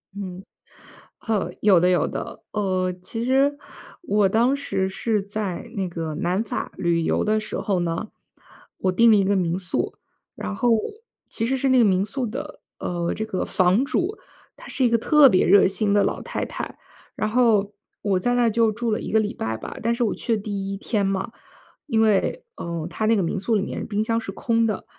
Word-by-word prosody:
嗯， 190 -2 -6 0.8
哦， 215 -3 0
有 200 -4 +6
的 180 +2 +3
有 180 - +2
的。 - - -6
呃， 185 -3 0
其 225 +5 -5
实， 275 +3 +3 0.5
我 205 - +2
当 235 +6 +3
时 190 -9 -1
是 210 +2 -1
在 200 -3 -4
那 190 -3 -2
个 165 -2 -4
南 185 +4 0
法 220 - -4
旅 170 -1 +1
游 - - +1
的 215 0 +2
时 215 - -4
候 195 -3 0
呢， 170 +5 -2 0.7
我 185 - 0
订 230 +5 +5
了 215 - +6
一 195 - +3
个 200 +1 +2
民 175 -1 0
宿。 180 - -2 0.4
然 100 0 -5
后， 235 -2 +3 0.5
其 225 - -2
实 265 +2 0
是 270 +1 +1
那 260 - +5
个 230 - +6
民 190 0 +2
宿 250 +3 -3
的， 270 +7 -7 0.2
呃， 170 -1 -2
这 220 - -3
个 190 -4 -2
房 185 +7 +3
主， 360 +7 -1 0.4
她 - - -13
是 260 - 0
一 - - +4
个 230 - +3
特 295 +4 +6
别 185 - +3
热 195 +1 +6
心 200 +2 0
的 205 - +4
老 - - -1
太 - - -3
太。 - - -6 0.4
然 215 - -1
后， 215 -4 +3 0.3
我 195 -3 +1
在 245 +6 0
那 245 - +3
儿 230 - +3
就 225 0 +3
住 235 +1 -2
了 215 - 0
1 - - -5
个 220 - +4
礼 210 -1 -1
拜 110 0 -3
吧， - - -8
但 230 - +2
是 245 - 0
我 220 - +1
去 230 - -1
的 - - -6
第 195 -2 -3
1 - - -4
天 205 0 -1
嘛， 195 +2 -2 0.6
因 225 -5 +2
为， 220 - +2
呃， 170 -1 -4
她 215 - -2
那 225 +1 +4
个 200 - +1
民 180 +4 -2
宿 220 +4 0
里 205 - +2
面 - - -5
冰 210 0 0
箱 230 0 0
是 195 - -5
空 230 +3 +1
的， 215 -3 -2
210 Hz, 225 characters per minute, -23 LUFS, 185-230 Hz, 0.8 s, 有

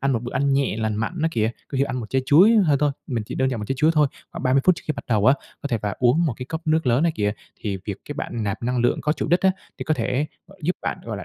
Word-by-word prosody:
ăn 135 0 +1
một 115 - -1
bữa 120 - -6
ăn 140 +2 +1
nhẹ 135 -5 +1
lành 110 -1 -1
mạnh 115 +12 -3
á 165 - +3
kìa, 110 -3 +1 0.2
có 135 - -3
thể 135 - +4
ăn 130 - -4
một 115 - -6
trái 130 0 +1
chuối 180 +11 +7
hơn 160 -9 +4
thôi, 145 0 +2 0.2
mình 115 -5 -2
chỉ - - -6
đơn 130 0 +1
giản 125 - -2
một - - -3
trái 135 - 0
chuối 155 +3 +4
thôi, 150 -1 +5 0.3
khoảng - - -6
30 130 +1 +3
phút 185 - +6
trước - - -9
khi 155 - +1
bắt - - -8
đầu 110 -3 +2
á, 130 - +7 0.3
có 145 - -3
thể 120 -4 0
và 105 -1 -2
uống 130 +7 +3
một 140 - 0
cái 125 - -7
cốc 160 +3 -4
nước 160 -2 +2
lớn 125 +6 +3
á 170 - +3
kìa, 105 -1 0 0.3
thì 100 -3 -3
việc 100 -3 -4
cái 145 - -4
bạn 120 -5 -4
nạp 100 +2 -3
năng 125 +1 0
lượng 120 0 +2
có 150 - +1
chủ - - -3
đích 175 +3 +3
á, 190 - +4 0.3
thì - - -4
có 155 - +1
thể 130 +1 -1 0.2
gọi 195 - -18
giúp 180 +4 0
bạn, - - -2
gọi 115 -2 -4
là, 95 - -7
130 Hz, 335 wpm, -23 LUFS, 115-155 Hz, 0.3 s, chuối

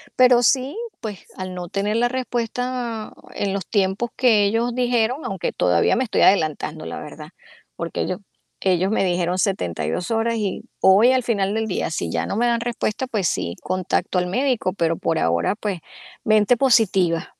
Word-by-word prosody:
pero 250 -1 +6
sí, 265 - +1 0.2
pues 210 -4 -7
al 185 0 -6
no 180 -1 -6
tener 205 +4 -1
la 240 +1 +3
respuesta 245 -2 -3 0.2
en 200 -1 -2
los 195 -3 -4
tiempos 200 +3 0
que 220 -5 +4
ellos 230 +3 0
dijeron, 245 +2 0
aunque - - -2
todavía - - +2
me 260 - +1
estoy - - 0
adelantando, 155 -3 +2
la - - -6
verdad, 150 +1 -10 0.5
porque 170 0 -4
ellos 185 - -3 0.4
ellos 185 0 +1
me 215 - +1
dijeron 180 0 0
72 170 - -1
horas 230 +1 +1
y 200 -3 -3 0.2
hoy 205 +7 +6
al 260 -1 +2
final 200 -4 0
del 220 0 -1
día, 185 - -2
si 85 - -3
ya 80 0 -1
no 200 - -3
me 240 - +2
dan 235 -1 +1
respuesta, 240 0 -2
pues 205 -8 0
sí, 85 +1 -2
contacto 185 0 -1
al 180 - +2
médico, 245 -2 0
pero 165 -3 0
por 165 - 0
ahora, 85 - +1
pues 205 -5 -3 0.4
mente 215 +2 +4
positiva. 195 -10 +2
205 Hz, 175 wpm, -22 LUFS, 180-240 Hz, 0.5 s, pero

